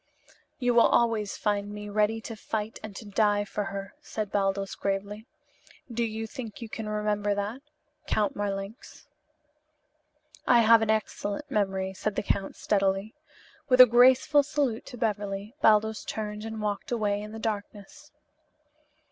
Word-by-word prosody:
"You 245 -1 +1
will 235 - +6
always 225 -4 +1
find 205 -1 -1
me 210 0 -7
ready 210 +2 +1
to 225 0 -7
fight 220 0 -4
and 215 -2 -8
to 220 - -8
die 205 0 +2
for 205 0 -3
her" 195 0 -6
said 215 -2 -5
Baldos 195 -1 0
gravely. 200 +3 -3 0.6
"Do 235 +1 -1
you 225 0 -3
think 225 -2 -8
you 230 - -6
can 215 0 -5
remember 210 -1 0
that. 205 +6 -3 0.5
Count 210 -2 +1
Marlanx?" 200 +2 -5 1.4
"I 240 -1 +6
have 225 0 +6
an 220 - 0
excellent 220 +4 -2
memory," 190 -2 0
said 205 +2 -3
the - - -1
count 195 -1 -1
steadily. 195 +1 0 0.6
With 255 -1 +4
a 255 - +13
graceful 255 +4 +5
salute 280 -5 -1
to 245 - -9
Beverly, 205 -1 -2
Baldos 220 0 +3
turned 210 0 -5
and 220 -1 -5
walked 205 +2 -3
away 205 -3 0
in 210 0 -8
the 220 - -7
darkness. 220 +6 -6
210 Hz, 150 wpm, -28 LUFS, 205-225 Hz, 1.4 s, a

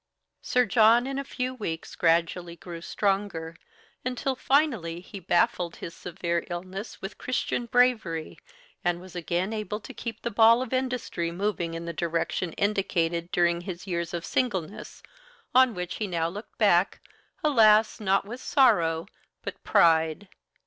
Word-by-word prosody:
Sir 250 0 +2
John 230 +2 +5
in 270 +1 -3
a - - -2
few 255 -1 -3
weeks 170 -10 -5
gradually 170 +1 +1
grew 170 -1 -9
stronger, 195 -4 -1 0.5
until 255 +1 -2
finally 250 - +1
he 195 +3 -10
baffled 175 -1 +1
his 165 - -7
severe 170 -1 -3
illness 185 +5 -6
with 195 +2 -7
Christian 240 -1 -2
bravery, 230 -10 +1 0.4
and 175 0 +1
was 185 0 -13
again 175 +4 -1
able 215 -1 -3
to - - -10
keep 230 -2 -6
the 235 - -2
ball 230 +3 +6
of 260 - -7
industry 250 -10 -1
moving 175 -2 -2
in 165 0 -5
the 170 - -4
direction 165 +1 -2
indicated 175 -4 0
during 170 0 +2
his 175 0 -7
years 170 -3 -2
of 170 -1 -4
singleness, 200 -7 -2 0.5
on 255 -3 +5
which 180 0 -4
he 215 - -2
now 165 -3 0
looked 205 +5 -10
back, 195 -3 +3 0.4
alas! 220 -7 +5
not 195 -2 +1
with 240 +5 -8
sorrow, 165 - +3 0.4
but - - -7
pride. 160 +3 +3
190 Hz, 150 wpm, -27 LUFS, 170-230 Hz, 0.5 s, ball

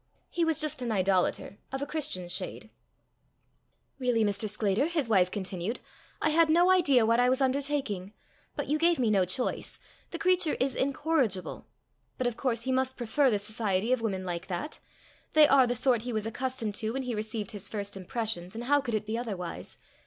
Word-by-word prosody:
He 345 - 0
was 325 -2 +2
just 305 -4 -2
an 240 -2 -2
idolater 190 0 +1
of 270 - -3
a - - -1
Christian 285 - -3
shade. 175 - -5 1.3
"Really, 245 -3 +2
Mr. 205 +1 0
Sclater," 210 +6 +1
his 320 -7 -1
wife 190 -5 +4
continued, 190 +2 -3 0.4
"I 310 - +3
had 325 +1 +4
no 350 +3 +5
idea 285 -11 +4
what 230 +2 +3
I 245 0 +4
was 260 +1 +2
undertaking. 265 -8 -1 0.4
But - - -2
you 300 +2 0
gave 340 +1 +4
me 235 -4 +2
no 195 -3 +3
choice. 185 +8 -2 0.3
The - - -5
creature 365 -5 +2
is 265 0 +1
incorrigible. 270 - 0 0.5
But 255 - -1
of 245 -2 0
course 235 -3 -1
he 260 - -1
must 260 0 0
prefer 265 +4 +2
the 215 - +2
society 210 +1 -1
of 255 - 0
women 195 -4 -2
like 175 0 -4
that. 190 - -4 0.5
They 310 -1 +7
are 270 -3 +5
the 245 - 0
sort 245 -1 +2
he 245 +1 -4
was 215 -1 -1
accustomed 245 -1 -3
to 220 +1 -2
when 270 +1 -2
he 250 -1 -3
received 215 -1 -3
his 205 -1 -7
first 200 -2 -5
impressions, 195 -2 -4
and 230 - -4
how 285 +3 +3
could 240 -5 -2
it 215 -1 -2
be 220 +2 -2
otherwise? 195 -8 -5
235 Hz, 195 wpm, -29 LUFS, 205-275 Hz, 1.3 s, They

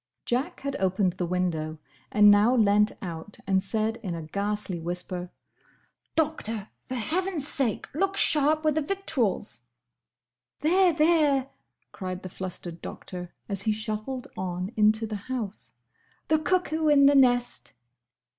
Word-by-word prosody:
'" - - -57
Jack 265 +9 -2
had 280 0 -3
opened 190 0 +1
the 180 0 -4
window 165 -3 -2 0.3
and 210 0 +7
now 210 +5 +4
leant 210 -2 +3
out 170 +2 -7
and 190 -1 +2
said 220 +3 -1
in 195 -7 -5
a 165 - -6
ghastly 200 +2 -3
whisper, 180 +1 -3 0.9
"Doctor!—For 255 -7 -3
Heaven's 320 - -1
sake 255 -9 +1
look 390 +6 0
sharp 310 -1 +7
with 310 -1 +2
the 310 - 0
victuals!" 270 - -2 1.0
"There, 360 +4 +4
there!" 300 -4 +2 0.4
cried 185 -1 -6
the 185 - -6
flustered 180 -2 -7
Doctor, 180 -1 -8 0.2
as 200 -2 -3
he 215 - 0
shuffled 215 +4 -4
on 180 +1 -4
into 215 +1 +3
the 215 -1 -4
house, 225 -6 -4 0.6
"the 315 0 +3
cuckoo 320 -1 0
in 285 -2 +6
the 285 - +6
nest!" 245 -3 +2
215 Hz, 135 wpm, -26 LUFS, 185-290 Hz, 1.0 s, and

